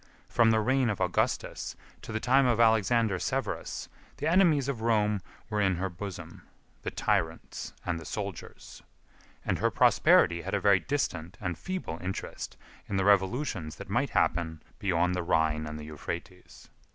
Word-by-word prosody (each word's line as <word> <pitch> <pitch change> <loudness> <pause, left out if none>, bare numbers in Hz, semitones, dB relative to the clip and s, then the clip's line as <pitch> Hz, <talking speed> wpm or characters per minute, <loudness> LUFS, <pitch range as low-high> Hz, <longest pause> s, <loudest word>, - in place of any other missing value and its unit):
From 115 -2 +4
the 110 0 +4
reign 130 +2 +2
of 105 - -2
Augustus 90 -1 -1 0.3
to - - -8
the 110 - -1
time 130 +3 +4
of 120 -2 +2
Alexander 110 -2 +3
Severus, - - -3 0.3
the 145 - -4
enemies 165 -6 +4
of 130 -5 -3
Rome 105 -3 +2 0.3
were 105 -1 -1
in 95 -2 +3
her 95 +3 -2
bosom—the 95 +1 -9
tyrants 80 0 -2
and 85 -2 -1
the 80 - -10
soldiers; 100 -4 -7 0.6
and - - 0
her - - +3
prosperity 85 0 +4
had - - -2
a - - +1
very 100 0 +5
distant 90 - -2
and 90 -4 -2
feeble 185 - -5
interest 95 +2 -5 0.3
in 100 - -1
the 95 - +1
revolutions 100 - +1
that 100 0 -10
might 135 +6 +1
happen 80 -5 0 0.2
beyond 90 -2 +1
the 90 - -1
Rhine 80 -2 +1
and 75 0 -5
the 75 - -8
Euphrates. 85 +4 -8
100 Hz, 160 wpm, -29 LUFS, 85-115 Hz, 0.6 s, very